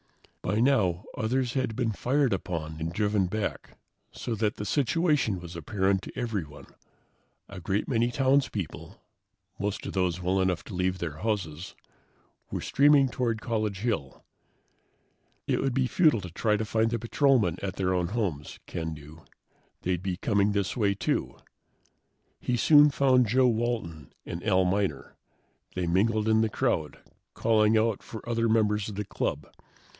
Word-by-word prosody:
By 105 +4 -1
now, 110 -9 +2
others 125 +2 -1
had 130 -5 -1
been 120 -2 0
fired 130 +3 +1
upon 80 -4 -4
and 80 +1 -3
driven 105 0 +1
back, 105 +2 -4 0.3
so 120 - -4
that 110 -1 0
the 105 - -5
situation 145 - +1
was 85 0 -9
apparent 95 +3 0
to - - -10
everyone. 85 - -4 0.8
A 95 - -9
great 100 +4 -1
many 120 -2 +1
townspeople, 130 - -1 0.6
most 105 +1 -3
of - - -5
those 90 -2 0
well 95 +2 +1
enough 95 -2 0
to - - -9
leave 90 0 0
their 85 -4 -5
houses, 90 -5 -3 0.7
were - - -3
streaming 140 -1 +4
toward 115 -2 -1
College 110 -4 -2
Hill. 105 - -3 1.2
It - - 0
would 135 -2 -1
be 135 -1 +2
futile 150 - +3
to 90 -2 -8
try 105 +4 +1
to 110 - -2
find 110 +1 +1
the 120 - -1
patrolmen 115 - +2
at 95 -2 -4
their 95 -1 0
own 90 -1 0
homes, 95 -9 -3
Ken 80 -2 -4
knew. 75 +2 -13 0.6
They'd 90 -1 -1
be 95 -2 -3
coming 100 0 +1
this 100 -2 -1
way, 100 -4 +1
too. - - -2 1.0
He 125 - -1
soon 150 +4 +7
found 130 -3 +3
Joe 130 +4 +4
Walton 110 - -2
and 85 - -6
Al 95 -3 +3
Miner. 95 -6 -1 0.6
They 90 -1 -1
mingled 105 +5 +1
in 110 0 +4
the 110 - +1
crowd, 80 -6 -1 0.4
calling 110 -1 +3
out 110 -1 +1
for 110 0 -10
other 115 -1 +1
members 105 -2 +2
of 105 - -7
the 105 +1 -3
club. 75 -5 -3
105 Hz, 160 wpm, -28 LUFS, 90-115 Hz, 1.2 s, soon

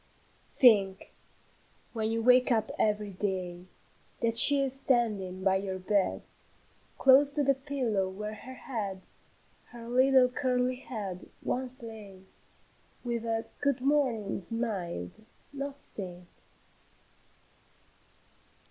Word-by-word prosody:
"Think, 200 -7 +3 0.8
when 220 -2 -2
you 225 0 -2
wake 250 +1 +4
up 225 -2 +1
every 210 -1 0
day, 185 -2 -4 0.5
That 230 -1 0
she 280 +4 +9
is 265 -1 -2
standing 210 -8 -1
by 190 0 +3
your 190 -1 -4
bed, 195 +1 -1 0.7
Close 275 +2 +5
to 290 - +1
the 275 0 +3
pillow 255 -8 -2
where 210 +3 -6
her 260 +4 -11
head, 200 -8 -6 0.6
Her 235 -1 -12
little 260 +1 +4
curly 250 -1 -1
head, 205 -8 -7
once 255 -1 -4
lay, 210 -4 -11 0.8
With 235 -2 -3
a 225 0 -2
'Good 280 -3 0
morning' 260 -8 0
smiled, 190 - -5 0.3
not 280 0 -6
said. 180 -7 -7
225 Hz, 110 wpm, -29 LUFS, 195-255 Hz, 0.8 s, she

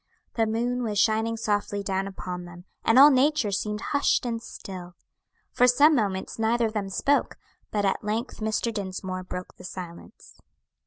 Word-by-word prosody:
The 225 -1 +1
moon 240 +3 -1
was 215 -4 -2
shining 220 +2 +2
softly 205 -2 -1
down 195 0 -1
upon 180 -2 -6
them, 175 0 -12 0.2
and 225 - +4
all 285 +3 +10
nature 270 -4 +2
seemed 210 +2 -2
hushed 285 -2 +2
and 230 -1 -2
still. 180 -5 -9 0.6
For 250 - +4
some 285 +6 +6
moments 200 -6 -1
neither 230 +1 +2
of 220 - -2
them 200 -3 -2
spoke, 280 +9 +1 0.3
but 205 -1 0
at 195 - 0
length 220 +4 -3
Mr. 220 +1 -1
Dinsmore 185 -2 -4
broke 180 0 -7
the - - -13
silence. 175 -2 -10
215 Hz, 165 wpm, -26 LUFS, 190-235 Hz, 0.6 s, all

